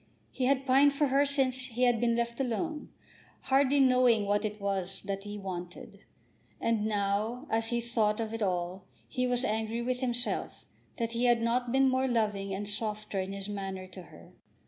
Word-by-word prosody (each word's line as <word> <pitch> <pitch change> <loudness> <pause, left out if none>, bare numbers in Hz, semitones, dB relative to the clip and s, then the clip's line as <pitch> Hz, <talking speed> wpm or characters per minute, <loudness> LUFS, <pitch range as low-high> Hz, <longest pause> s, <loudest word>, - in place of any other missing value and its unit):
He 255 - -2
had 270 0 +2
pined 275 +2 +5
for 280 0 +1
her 280 +2 +3
since 265 -2 +1
he 245 0 -2
had 240 -2 +3
been 235 -1 +2
left 235 +1 -2
alone, 295 +5 -2 0.5
hardly 275 +1 +3
knowing 250 -5 +4
what 205 +1 +1
it 210 0 -4
was 195 -2 -2
that 195 0 -4
he 205 0 -6
had 205 - -8
wanted. 180 -2 -7 0.6
And 225 -2 0
now 210 +5 -1
as 225 0 +1
he 240 -1 0
thought 225 -3 0
of 225 -1 -3
it 225 - -4
all, 180 -1 -2 0.2
he 250 -1 -1
was 245 0 +1
angry 220 +2 -1
with 250 +1 -1
himself 245 -1 0 0.3
that 230 -1 -2
he 235 +1 0
had 240 -1 +3
not 240 +1 0
been 270 +1 +4
more 260 0 +2
loving 210 -5 0
and 200 +2 -3
softer 210 -1 -2
in 190 +1 -3
his 195 0 -3
manner 195 -2 -5
to 185 0 -10
her. 85 - -15
230 Hz, 190 wpm, -30 LUFS, 200-255 Hz, 0.6 s, pined